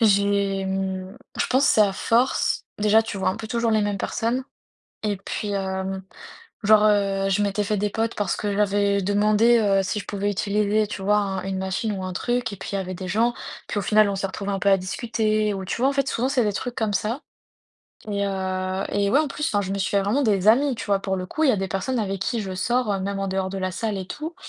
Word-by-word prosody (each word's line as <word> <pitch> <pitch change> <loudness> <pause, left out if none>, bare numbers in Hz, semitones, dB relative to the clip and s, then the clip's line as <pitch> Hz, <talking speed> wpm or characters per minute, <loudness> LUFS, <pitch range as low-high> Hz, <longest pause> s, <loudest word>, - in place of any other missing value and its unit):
j'ai, 200 -2 +2
mmh, 190 +1 -3 0.2
je - - +1
pense, 265 +3 +3
c'est 215 - +4
à 200 -2 +4
force 235 +6 +1 0.2
déjà, 215 +2 +4
tu 220 -2 -5
vois 190 - +1
un - - -4
peu 220 - -7
toujours 235 -1 0
les 215 -1 +3
mêmes 205 -1 -1
personnes. 245 +5 -1 0.6
Et 205 -2 0
puis, 205 +1 -4
hem, 190 -1 -2 0.6
genre, 215 +1 +6
heu, 195 -2 +2
je 205 +2 +2
m'étais 205 +1 0
fait 210 +1 0
des 205 +1 0
potes 225 +2 -1
parce 205 - -1
que 205 -1 -2
j'avais 200 -1 +2
demandé, 210 +4 +4
heu, 195 -3 +3
si 195 +2 -2
je - - -7
pouvais 205 0 -1
utiliser, 210 +2 +1
tu 200 -1 -6
vois, 205 +2 +3
un 195 -2 -2
une 190 0 -3
machine 190 +3 -2
ou 185 - -4
un 185 - -4
truc 240 +3 -1
et - - -6
puis, - - -7
il - - -2
y - - -1
avait 185 -1 -4
des 185 +1 -6
gens. 230 +5 +2 0.3
Puis, - - -3
au - - -1
final, 210 +1 +4
on 200 - -1
s'est 195 - -1
retrouvé 200 +1 -4
un 195 - -1
peu 200 - +2
à 195 - +6
discuter 215 +2 -1
ou 195 -1 -4
tu 185 - -3
vois, 265 - +4
en - - +1
fait, 275 -1 0
souvent, 245 +3 0
c'est 260 -4 +2
des 205 - +1
trucs 245 +4 -4
comme 220 -2 0
ça. 230 +8 -1 0.9
Et 200 -1 0
heu 190 0 -2
et 200 0 0
ouais, 275 - +4
en 310 - -1
plus, 300 +2 -3
enfin 205 - +2
je 190 -1 -4
me 200 - -2
suis 195 - -1
vraiment 210 +9 +1
fait 220 - +3
des 190 - +1
amis, 265 +5 +4
tu 230 - -6
vois? 200 -1 +2
Pour 190 -1 -2
le 185 - -4
coup, 315 +11 -1
il 270 - +6
y - - +3
a - - +1
des 195 0 -2
personnes 245 +8 -2
avec 195 -3 -2
qui 230 +4 -1
je 190 -3 -4
sors, 240 +5 0
heu, 200 - 0
même 200 +1 -3
en 195 0 -2
dehors 190 0 -1
de 195 - -4
la 185 -1 -2
salle 210 +1 -2
et 190 - -5
tout. 310 - -6
205 Hz, 265 wpm, -24 LUFS, 195-220 Hz, 0.9 s, genre